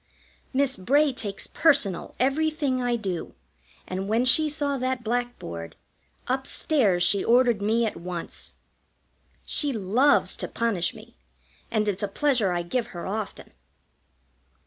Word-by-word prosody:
Miss 270 0 +1
Bray 280 +9 +3
takes 205 -5 -4
personal 275 - +2
everything 275 0 +1
I 245 -1 +1
do, 190 -7 -4 0.5
and 190 +1 -3
when 230 +3 +2
she 305 +5 +5
saw 290 -1 -1
that 255 -1 -1
blackboard, 220 - -3 0.5
up 265 +1 -1
stairs 205 - +2
she 195 +2 +2
ordered 240 -3 +4
me 225 +3 +2
at 220 - -2
once. 175 -1 -6 0.9
She 290 -2 -1
loves 230 +6 +2
to - - -3
punish 220 -7 -1
me, - - -14 0.5
and 215 -1 0
it's 200 -1 -1
a 205 - 0
pleasure 245 -3 +1
I 175 -1 -1
give 230 +7 -1
her 175 -2 -7
often. 210 +1 -5
235 Hz, 135 wpm, -26 LUFS, 195-265 Hz, 0.9 s, she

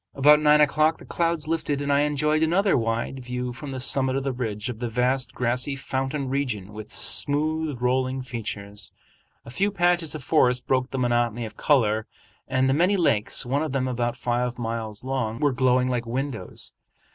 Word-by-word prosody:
About 150 +2 +6
nine 150 0 +5
o'clock 155 +2 +3
the - - -14
clouds 165 -3 -1
lifted 155 -3 -1
and 140 0 0
I 140 - +4
enjoyed 150 +1 +1
another 185 +5 +3
wide 115 +2 -2
view 125 0 -4
from 140 +3 -8
the 130 -1 -5
summit 130 0 +1
of 135 - -1
the 135 - -1
ridge 110 -3 -4
of 120 -3 -5
the 120 -1 -3
vast 125 +2 0
grassy 125 +3 0
fountain 135 +1 -3
region 120 -8 -3
with 105 0 -9
smooth 155 -1 0
rolling 130 +1 0
features. 105 -5 -6 0.5
A 115 - -9
few 200 +10 +1
patches 175 -5 +2
of 150 - -7
forest 125 -5 +2
broke 130 0 +1
the 135 - -4
monotony 120 -2 0
of 110 0 -9
color, 110 -7 +2 0.4
and 130 0 +1
the 135 - +3
many 180 +7 +3
lakes, 120 - +2
one 135 +4 0
of 155 -4 -3
them 130 -1 0
about 120 -1 -2
five 120 0 -1
miles 115 -2 -4
long, 130 -4 -2
were 145 -3 +2
glowing 125 0 +2
like 120 -2 -2
windows. 130 0 -4
130 Hz, 185 wpm, -25 LUFS, 120-145 Hz, 0.5 s, About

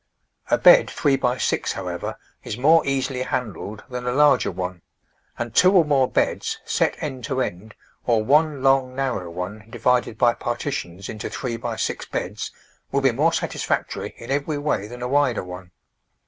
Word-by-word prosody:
A - - +4
bed - - +7
three 140 -3 +2
by 125 -1 0
six, - - 0
however, - - -5 0.3
is 105 - -5
more 155 +6 +5
easily 135 -1 -1
handled 110 -4 -4
than 125 -2 -5
a - - +1
larger 145 +2 +4
one; 90 -1 -5 0.6
and 120 -1 -4
two 185 +8 +6
or 180 -4 +6
more 135 -3 +3
beds, - - 0
set - - +1
end 130 -2 -4
to 135 -2 -2
end, 110 -2 -4 0.3
or 115 -3 +3
one 145 +2 +3
long, 135 -1 +3
narrow 130 -10 -2
one 95 +5 -6
divided 120 0 +1
by 120 +1 +4
partitions 120 -7 -4
into 105 - -5
three 125 -3 -3
by 115 - -4
six - - -2
beds, - - -4 0.4
will 140 - +1
be 135 -1 +4
more 150 +8 +2
satisfactory - - -2
in 115 - -8
every 145 +2 0
way 145 -9 -1
than 120 +2 -8
a - - -1
wider 135 -4 +2
one. 90 0 -9
125 Hz, 175 wpm, -23 LUFS, 110-140 Hz, 0.6 s, bed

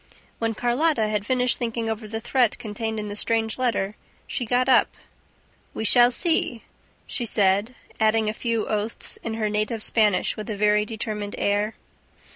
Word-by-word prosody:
When 225 -1 -1
Carlotta 245 -1 +1
had 210 -1 -2
finished 250 -1 +1
thinking 230 -1 -2
over 220 0 -4
the 220 +1 -4
threat 240 0 +1
contained 220 0 -4
in 210 - -4
the 205 - -5
strange 225 +2 0
letter, 215 -5 0 0.3
she 245 - -4
got 250 +2 +2
up. 260 - +3 0.8
"We 220 - -3
shall 240 +2 +7
see," 250 -4 +1 0.4
she 245 - -3
said, 205 +4 +2 0.2
adding 220 0 +2
a 215 - 0
few 230 -1 -1
oaths 215 +1 -3
in 225 -1 -4
her 220 -1 -1
native 215 +1 -1
Spanish 210 -4 +2
with 215 +2 -7
a 215 - -2
very 210 0 +3
determined 210 -2 -4
air. 205 +2 0
220 Hz, 165 wpm, -24 LUFS, 210-240 Hz, 0.8 s, shall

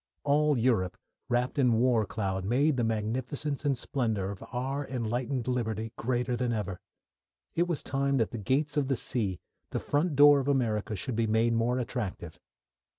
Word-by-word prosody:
All 150 0 +3
Europe 110 -7 +1 0.3
wrapped 125 +3 0
in 125 -3 +4
war 115 -2 +3
cloud 95 -4 -2
made 135 +9 +2
the 120 - 0
magnificence 125 +7 -2
and 140 -3 +1
splendour 110 -7 -1
of 100 - -8
our 135 +3 -2
enlightened 125 +1 -2
liberty 110 -3 -2
greater 125 +1 -1
than 120 0 -1
ever. 100 -5 -3 0.7
It 175 +1 +1
was 170 -4 -2
time 140 0 0
that 115 -6 +1
the 115 - -5
gates 145 +8 0
of 140 -2 +2
the 135 - +1
sea, 105 -7 -1 0.3
the - - -2
front 150 +2 0
door 145 0 +8
of 135 - -3
America, 110 -6 0
should 115 +5 -4
be 115 0 +1
made 115 +2 +2
more 115 +2 +1
attractive. 110 -9 -4
125 Hz, 170 wpm, -29 LUFS, 110-135 Hz, 0.7 s, door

